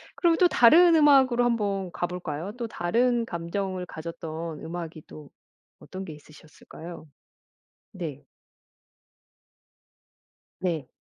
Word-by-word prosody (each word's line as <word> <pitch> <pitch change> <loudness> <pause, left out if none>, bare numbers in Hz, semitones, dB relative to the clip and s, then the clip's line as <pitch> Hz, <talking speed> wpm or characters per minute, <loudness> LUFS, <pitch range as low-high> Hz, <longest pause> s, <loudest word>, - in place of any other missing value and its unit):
그럼 340 -2 +3
또 360 - +5
다른 335 +5 +6
음악으로 270 -5 +5
1 235 -1 +2
번 195 -3 -2
가볼까요? 175 0 -4
또 235 - -2
다른 235 +6 +1
감정을 185 0 -4
가졌던 160 -1 -7
음악이 165 -1 -6
또 150 -2 -12 0.5
어떤 190 +1 -8
게 160 - -8
있으셨을까요? 155 +2 -13 0.9
네. 160 -8 -7 2.4
네. 170 -6 -2
180 Hz, 205 characters per minute, -26 LUFS, 160-235 Hz, 2.4 s, 다른